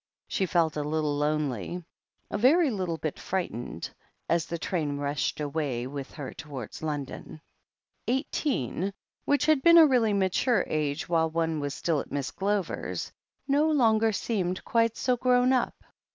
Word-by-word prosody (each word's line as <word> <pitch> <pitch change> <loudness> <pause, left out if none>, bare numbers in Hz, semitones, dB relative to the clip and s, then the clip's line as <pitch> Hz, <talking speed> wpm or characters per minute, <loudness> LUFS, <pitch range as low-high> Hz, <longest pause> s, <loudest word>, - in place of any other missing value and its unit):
She 190 - 0
felt 165 -3 +2
a 150 - -1
little 150 0 0
lonely, 150 - -1 0.5
a - - -1
very 290 +5 +5
little 185 -6 -2
bit 155 -2 -4
frightened, 120 - -4 0.4
as 170 -1 +1
the 170 - -3
train 155 -4 -2
rushed 145 +1 -1
away 145 -5 -2
with 135 +1 -6
her 145 -4 -6
towards 135 -7 -8
London. 150 0 -5 0.7
Eighteen, 235 - -1 0.3
which 285 +1 +2
had 310 -3 +4
been 335 +3 +7
a 325 - +10
really 240 -7 +3
mature 195 +3 +2
age 150 -1 -2
while 165 -1 +2
one 160 -1 -1
was 145 -1 -3
still 165 -4 0
at - - -7
Miss 140 -1 -2
Glover's, 200 -1 -2 0.4
no 290 +3 +3
longer 225 -6 +3
seemed 185 -4 -2
quite 230 -1 +2
so 250 -1 +1
grown 250 +1 +3
up. 255 - +1
170 Hz, 150 wpm, -28 LUFS, 150-230 Hz, 0.7 s, a